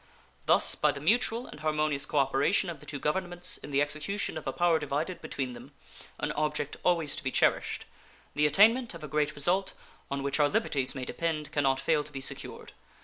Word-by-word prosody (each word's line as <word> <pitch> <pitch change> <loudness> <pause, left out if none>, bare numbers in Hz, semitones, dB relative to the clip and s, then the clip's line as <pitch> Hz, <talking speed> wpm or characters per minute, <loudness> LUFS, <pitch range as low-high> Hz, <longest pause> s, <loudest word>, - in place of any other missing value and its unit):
Thus - - +5
by 150 - +2
the 140 - -7
mutual 230 - +1
and 150 - -11
harmonious 150 -2 0
cooperation 145 +6 +2
of 160 - -9
the 150 - -15
two 145 - -4
governments 175 +4 -1
in - - -9
the 140 0 +3
execution 155 +8 -2
of 155 - -6
a - - +1
power 170 +1 +2
divided 150 +5 -3
between 135 -5 -4
them, - - -12 0.4
an - - -2
object 150 -1 -1
always 170 -5 +2
to - - -5
be 130 - 0
cherished, - - +1 0.5
the 150 0 +3
attainment 220 - +4
of 165 - -10
a - - -5
great 150 0 0
result, 180 +7 +1 0.4
on 140 0 -3
which 140 +2 -1
our 145 -1 +4
liberties 145 - 0
may 130 -1 -4
depend, 155 -2 -3
can 145 - +1
not 135 -1 +2
fail 155 -2 +1
to 150 - -11
be 135 - -5
secured. 135 - -4
150 Hz, 205 wpm, -29 LUFS, 140-175 Hz, 0.5 s, Thus